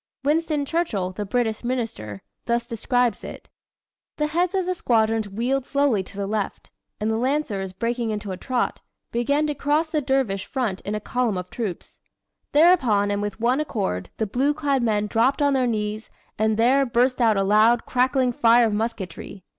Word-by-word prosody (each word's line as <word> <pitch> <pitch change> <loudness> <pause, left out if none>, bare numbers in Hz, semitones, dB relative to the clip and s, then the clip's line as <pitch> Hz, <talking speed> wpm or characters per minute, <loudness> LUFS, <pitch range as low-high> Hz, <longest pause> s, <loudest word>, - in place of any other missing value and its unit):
Winston 300 0 +1
Churchill, 260 - -1
the 205 +2 -5
British 225 0 -1
Minister, 225 - -4 0.2
thus 235 0 0
describes 240 0 0
it: - - -10 0.7
"The 300 - +1
heads 350 +5 0
of 380 -2 +1
the 365 - 0
squadrons 225 - +1
wheeled 245 +7 -1
slowly 280 -7 +2
to 190 - -12
the 200 - -2
left, 205 0 -4 0.3
and 215 +1 0
the 220 - 0
Lancers, 235 -7 -1
breaking 230 +4 -2
into 210 -2 -4
a - - -3
trot, 250 +5 -2 0.3
began 280 +6 +1
to 300 - -1
cross 300 +3 0
the 305 - +1
dervish 260 -8 0
front 225 -8 -2
in 210 +1 -3
column 240 -3 -1
of 180 0 -6
troops. 215 -7 -5 0.5
Thereupon 260 - +4
and 205 0 -1
with 205 0 -4
one 245 +4 +2
accord 195 - -3
the 220 - 0
blue 270 +8 0
clad 280 -3 0
men 210 -3 +1
dropped 235 +7 +1
on 285 -1 +3
their 260 -2 +2
knees, 215 -1 -3 0.3
and 220 0 +1
there 255 +5 +4
burst 250 0 +1
out 220 -3 +4
a 195 - +2
loud, 215 +4 +4
crackling 255 0 +2
fire 235 +1 +5
of 220 - 0
musketry. 205 -3 -4
235 Hz, 180 wpm, -23 LUFS, 210-270 Hz, 0.7 s, fire